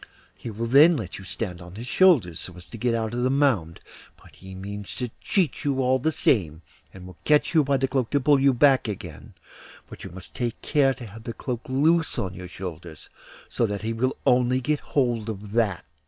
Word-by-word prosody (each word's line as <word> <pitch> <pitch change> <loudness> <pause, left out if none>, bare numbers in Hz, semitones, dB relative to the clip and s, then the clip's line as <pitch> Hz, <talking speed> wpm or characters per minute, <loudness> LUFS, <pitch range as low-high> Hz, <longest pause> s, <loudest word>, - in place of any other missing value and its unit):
He - - -8
will 115 +2 -4
then 145 +7 +6
let 100 -7 -6
you 95 - -11
stand 95 -4 -5
on 90 +1 -11
his 115 +3 -7
shoulders, 125 - +3
so 90 - -9
as 90 - -12
to 115 - -10
get 120 +1 +1
out 110 0 -2
of 120 - -2
the 130 - +2
mound; 130 - +1 0.4
but - - -19
he 95 0 -11
means 100 -1 -7
to 125 -3 -4
cheat 180 -10 0
you 140 -2 0
all 130 0 +2
the 160 +5 0
same, 85 - +1 0.3
and 95 -1 -12
will 90 -2 -13
catch 150 +2 +3
you 160 -2 +5
by 140 0 +1
the 135 0 0
cloak 130 -3 -1
to 145 - +2
pull 140 +1 +4
you 135 0 +5
back 130 0 +4
again; 90 -7 -8 0.5
but - - -11
you - - -7
must 90 +1 -12
take 120 -2 -3
care 135 -3 +2
to 120 0 -9
have 110 +2 -12
the 115 - -4
cloak 120 -2 -4
loose 160 +5 +2
on 95 -2 -2
your 90 0 -8
shoulders, 85 -4 -9 0.4
so 115 - 0
that 105 0 -4
he 115 +1 -1
will 130 +3 -1
only 125 -1 +3
get 145 +3 0
hold 120 -5 -1
of 105 -1 -7
that. 105 -6 0
115 Hz, 225 wpm, -25 LUFS, 95-135 Hz, 0.5 s, then